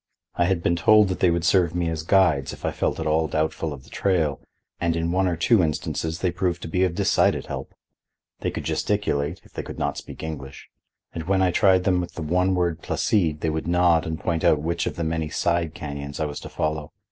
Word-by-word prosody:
I 85 - +1
had 90 -2 0
been 85 - +2
told 105 +3 +5
that 95 - -3
they 90 - +4
would 85 -1 0
serve 85 -1 +3
me 90 -1 0
as 80 -1 -2
guides 80 -6 +2
if - - -8
I - - +1
felt - - -1
at 80 - -3
all 80 +1 +2
doubtful 80 +1 -1
of 70 -3 -8
the - - -19
trail, 80 -8 0 0.4
and 85 -1 0
in 85 0 -1
one 95 +1 +2
or 90 - 0
two 100 +5 +4
instances 80 +1 -2
they 90 - +1
proved 90 -1 -2
to - - -4
be 90 +3 +1
of 90 -2 0
decided - - +2
help. - - -7 0.6
They - - -1
could - - -5
gesticulate, 85 -7 -1
if - - -21
they - - -4
could - - -9
not - - -2
speak - - -10
English, 70 -4 -7 0.4
and 80 - -5
when 95 +1 +2
I 90 - +3
tried 95 +1 +4
them 90 -1 +2
with 90 - -7
the 85 - -4
one 90 +4 +1
word 85 -2 0
Placide 80 -8 0
they 80 - 0
would 80 +1 -3
nod 85 -2 +3
and 80 -1 -3
point 80 -1 -1
out 75 - +4
which 85 +2 -1
of - - -3
the 85 - -3
many 80 -1 -1
side 85 0 0
canyons 70 -1 -6
I 80 - 0
was 75 -1 -5
to - - -9
follow. 75 -1 -2
85 Hz, 240 wpm, -24 LUFS, 80-90 Hz, 0.6 s, told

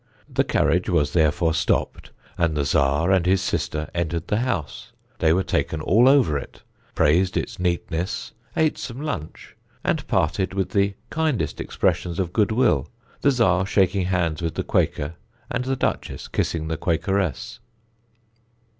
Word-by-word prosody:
The - - +1
carriage 90 +2 +1
was 80 -5 +1
therefore 80 0 +2
stopped, 80 0 -1 0.3
and 85 -3 0
the 70 - +1
Czar 70 +5 +2
and 95 -2 +4
his 95 +1 +4
sister 75 -4 -2
entered 85 0 -2
the 105 - +2
house; 100 - -3 0.3
they 80 - +3
were 95 +3 +2
taken 80 - -1
all 115 +11 +4
over 125 - +4
it, - - -12 0.3
praised 90 +5 +3
its - - -3
neatness, 90 0 -2 0.3
ate 160 -1 +2
some 125 +1 -6
lunch, 125 - -6 0.3
and - - -1
parted 95 +4 0
with 95 -2 -1
the 100 -1 +1 0.2
kindest 155 -7 -1
expressions 85 -2 -1
of 90 -2 -2
goodwill, 110 - +2 0.3
the - - +4
Czar 95 -9 +3
shaking 95 -2 +2
hands 85 -3 0
with 85 -1 -2
the - - -1
Quaker 75 +2 0 0.4
and 125 0 -1
the 135 +1 0
Duchess - - -2
kissing 80 -2 -2
the 80 0 -2
Quakeress. 90 -1 -1
90 Hz, 150 wpm, -23 LUFS, 80-100 Hz, 0.4 s, and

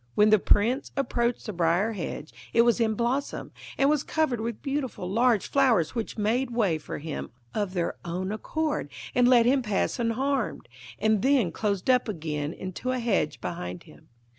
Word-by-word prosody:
When 210 +1 +5
the 215 - +6
Prince 235 +9 +2
approached 240 -3 0
the 215 - -4
briar 175 +5 +2
hedge 165 -6 -6 0.2
it 230 - +6
was 235 0 +3
in 220 -2 +2
blossom, 245 +5 -2 0.3
and 275 - +4
was 300 -1 +3
covered 300 -7 0
with 230 -1 -4
beautiful 275 -9 -3
large 230 +1 +2
flowers 245 - +3
which 230 -1 -4
made 235 +5 +1
way 210 -9 +1
for - - -6
him 155 0 -5 0.2
of 205 -3 -2
their 170 -1 -1
own 180 +3 -3
accord 300 - -2 0.2
and 245 -1 +4
let 245 -2 +6
him 265 +2 +3
pass 210 +1 -1
unharmed, 260 +4 -1 0.3
and 215 -2 +2
then 260 -9 +3
closed 200 -4 -2
up 250 -1 +4
again 155 -5 -3
into 185 +8 -5
a 255 - -1
hedge 230 -10 0
behind 90 - -5
him. - - -18
225 Hz, 175 wpm, -27 LUFS, 185-255 Hz, 0.3 s, the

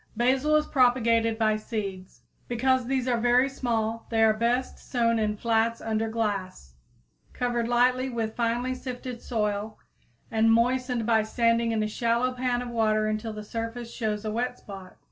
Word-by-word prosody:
_ - - -34
Basil 265 +5 +2
is 305 0 +3
propagated 230 -4 +2
by 215 -1 +2
seeds. 200 -4 -6 0.2
Because 255 +1 +1
these 260 -1 0
are 240 -2 +1
very 245 +3 +4
small, 230 -4 -2
they 225 -1 +2
are 220 -1 +5
best 235 +4 -1
sown 230 -2 0
in 210 -1 -1
flats 230 +1 +1
under 220 0 -1
glass, 195 - -3 0.6
covered 240 -2 -1
lightly 250 +2 +2
with 225 -3 -3
finely 240 +2 0
sifted 250 -1 -7
soil 210 -1 -2 0.5
and 225 0 +3
moistened 245 0 +1
by 225 -1 +3
standing 230 +1 +1
in 220 -1 0
a - - 0
shallow 235 +3 0
pan 250 -1 -1
of 245 - -6
water 215 -2 +1
until 215 +1 -2
the 210 0 -7
surface 230 +2 -5
shows 215 -2 -3
a 215 - -1
wet 245 +3 -2
spot. 195 -2 -11
230 Hz, 165 wpm, -27 LUFS, 220-245 Hz, 0.6 s, are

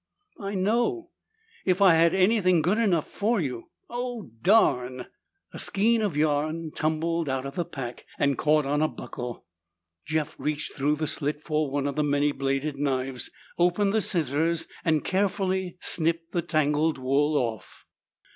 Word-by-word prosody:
"I 200 -1 -4
know. 240 - 0 0.5
If 185 0 +1
I 195 -4 +7
had 165 +2 +4
anything 185 -4 +3
good 195 +7 +2
enough 185 -9 +2
for 220 +2 0
you 125 -8 -4 0.2
Oh, 245 - -5
darn!" 125 - +3 0.5
A - - -7
skein 225 +3 +2
of 200 -8 -1
yarn 155 +2 0
tumbled 160 +1 -1
out 135 0 -2
of 140 - -5
the 175 +3 -2
pack 125 -5 -7
and 140 -1 +2
caught 150 +1 +2
on 145 +2 0
a 155 - +3
buckle. 125 -5 -7 0.6
Jeff 155 -1 -2
reached 150 0 -3
through 145 +2 +1
the 155 +1 -2
slit 150 0 -3
for 155 -2 0
one 140 0 -1
of 140 - -2
the 150 - +1
many 145 0 +2
bladed 135 +1 -2
knives, 130 -2 -2 0.3
opened 180 +3 +2
the 220 - +2
scissors, 165 -1 0 0.2
and 155 -3 +1
carefully 190 -1 0
snipped 165 0 +1
the 175 - 0
tangled 155 -1 +1
wool 140 +3 +1
off. 115 -5 -4
155 Hz, 155 wpm, -26 LUFS, 145-185 Hz, 0.6 s, I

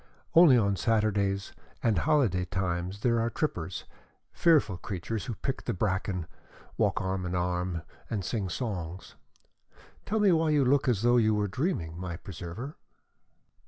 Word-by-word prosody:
Only 165 -7 +8
on 100 -3 +2
Saturdays 100 -2 +1 0.3
and 110 -6 +3
holiday 120 - +2
times 90 +1 -2
there 115 -1 +2
are 115 +1 +1
trippers, 90 - -3 0.5
fearful 150 - +3
creatures 100 +4 -4
who 120 -4 -4
pick 135 +4 -4
the 120 - -1
bracken, 95 -2 -1 0.5
walk - - +1
arm 95 0 -2
in 90 0 -3
arm, 90 -1 -1 0.3
and 100 -5 -2
sing 100 -2 -2
songs. 90 -4 -4 0.9
Tell 220 +2 +1
me 205 -2 +5
why 160 -1 +3
you 145 -3 +3
look 135 +2 +3
as 115 -4 +1
though 120 +1 +5
you 110 -2 +3
were 105 -1 +1
dreaming, 95 - -2
my 90 -2 -4
preserver?" 95 - -7
100 Hz, 150 wpm, -29 LUFS, 90-125 Hz, 0.9 s, Only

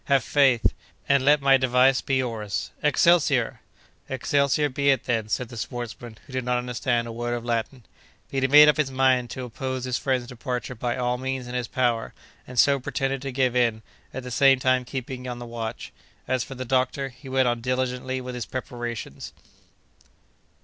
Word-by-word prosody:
Have 140 -3 +3
faith, 135 -5 +3 0.4
and 140 -1 +3
let 145 0 +4
my 135 -1 +6
device 130 0 +3
be 135 - -1
yours—'Excelsior!'" 130 - +1 0.5
"'Excelsior' 140 +2 +1
be 140 +1 0
it 135 -4 +3
then," 115 -3 -1
said 120 +2 -2
the 120 - -9
sportsman, 120 -1 -6
who 135 - -14
did 130 -1 -1
not 125 0 0
understand 125 -1 -1
a - - -6
word 120 +1 -3
of 120 0 -6
Latin. 120 +2 -2 0.5
But 135 - -1
he 135 - +3
made 150 +2 +8
up 150 - +4
his 150 -3 +1
mind 130 -2 +2
to 130 - -6
oppose 130 +1 -4
his 125 0 -1
friend's 130 -2 0
departure 125 0 -5
by 120 0 -3
all 125 0 -1
means 130 -1 -3
in 125 - -7
his 125 -2 -2
power, 120 -3 -1 0.3
and 125 - -10
so 140 +2 +5
pretended 135 +1 -2
to 135 -1 -4
give 130 -1 +1
in, 115 -3 +1 0.3
at 130 - -6
the 125 - -7
same 135 +1 +5
time 130 0 +1
keeping 130 0 -6
on 125 -1 -4
the 120 - -7
watch. 115 -1 -6 0.3
As 130 -2 0
for 135 - -9
the 130 0 -5
doctor, 130 +2 0
he 130 +2 -13
went 130 -1 +2
on 120 -1 0
diligently 130 +1 -2
with 125 0 -6
his 125 -2 -5
preparations. 120 -3 -6
125 Hz, 190 wpm, -25 LUFS, 120-135 Hz, 0.5 s, made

